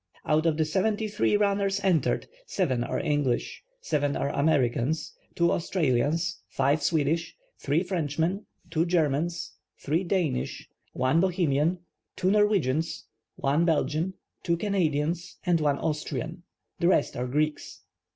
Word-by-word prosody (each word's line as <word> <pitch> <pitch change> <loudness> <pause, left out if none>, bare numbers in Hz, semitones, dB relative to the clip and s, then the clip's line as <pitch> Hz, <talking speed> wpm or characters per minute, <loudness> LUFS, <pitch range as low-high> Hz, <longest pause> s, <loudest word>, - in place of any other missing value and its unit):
Out 155 +2 +2
of 155 -2 +1
the 160 - +2
seventy 210 +7 0
three 210 0 +1
nmners 200 -1 +1
entered, 180 -5 +1 0.2
seven 130 -11 0
are - - -2
English, 145 -7 -1 0.2
seven 145 - 0
are 140 - -1
Americans, 140 -1 +1 0.2
two 170 0 +3
Australians, 160 -1 0
five 140 +3 +1
Swedish, 155 +2 0 0.2
three 155 +5 +1
Frenchmen, 170 +2 -1 0.2
two 165 0 +2
Germans, 170 0 0 0.2
three 160 +6 0
Danish, 170 -8 -1 0.3
one 130 +5 +2
Bohemian, 170 -3 +2 0.4
two 185 +1 +1
Norwegians, 165 -7 +1 0.3
one 145 +4 +1
Belgian, 165 +2 0 0.3
two 170 -1 0
Canadians, 170 -4 -1
and 175 -3 +2
one 145 -2 +2
Austrian. 160 +2 -3 0.4
The 170 - +2
rest 180 -5 +2
are 125 +1 -2
Greeks. 150 +4 -2
160 Hz, 125 wpm, -27 LUFS, 145-180 Hz, 0.4 s, two